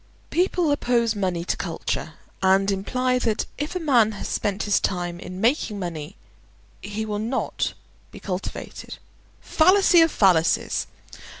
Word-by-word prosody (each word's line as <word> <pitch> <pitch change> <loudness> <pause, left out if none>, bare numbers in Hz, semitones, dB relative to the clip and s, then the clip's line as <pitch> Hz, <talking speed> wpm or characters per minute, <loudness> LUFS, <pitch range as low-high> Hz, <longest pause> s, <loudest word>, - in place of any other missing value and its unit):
People 355 -2 +1
oppose 235 -5 +1
money 180 -4 -2
to - - 0
culture, - - -4 0.3
and 195 +1 +3
imply 250 +6 0
that 220 -3 0
if 295 +5 -3
a - - 0
man 245 -9 +3
has 205 - -6
spent 205 0 -1
his 205 - +2
time 175 -2 -2
in 185 +1 -8
making 225 -1 +1
money 170 -2 -5 0.7
he 210 +1 -4
will 210 -1 -3
not 235 +5 -2 0.3
be - - -12
cultivated—fallacy 335 - 0
of 325 -1 +4
fallacies! 180 -5 +2
210 Hz, 130 wpm, -24 LUFS, 190-255 Hz, 0.7 s, of